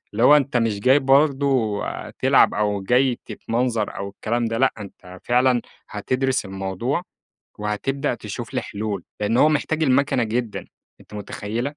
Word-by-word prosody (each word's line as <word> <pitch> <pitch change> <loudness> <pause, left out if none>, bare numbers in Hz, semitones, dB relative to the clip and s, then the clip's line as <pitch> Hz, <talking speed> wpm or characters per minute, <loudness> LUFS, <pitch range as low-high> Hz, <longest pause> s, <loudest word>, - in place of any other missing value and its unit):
اللي - - -1
هو 145 +4 +8
أنت 140 -3 0
مش 115 -4 0
جاي 130 +6 +5
برضه 135 -5 +2 0.3
تلعب - - +3
أو 105 -1 0
جاي 125 +4 +2
تتمنظر 115 -2 -2
أو 100 0 -4
الكلام 115 +4 -2
ده 115 0 -2
لأ، 130 +1 +3
أنت 95 -2 -11
فعلًا 125 0 +3 0.3
هتدرس 130 -1 -1
الموضوع، 95 - -3 0.6
وهتبدأ 105 +6 -2
تشوف - - -7
لي - - +1
حلول. 100 -3 -4 0.2
لأنّ 105 +3 +1
هو 150 - +5
محتاج 155 +1 0
المكنة 140 -2 +2
جدًا، 115 0 -3 0.4
أنتِ - - -15
متخيّلة؟ 105 +2 -4
120 Hz, 150 wpm, -22 LUFS, 105-135 Hz, 0.6 s, هو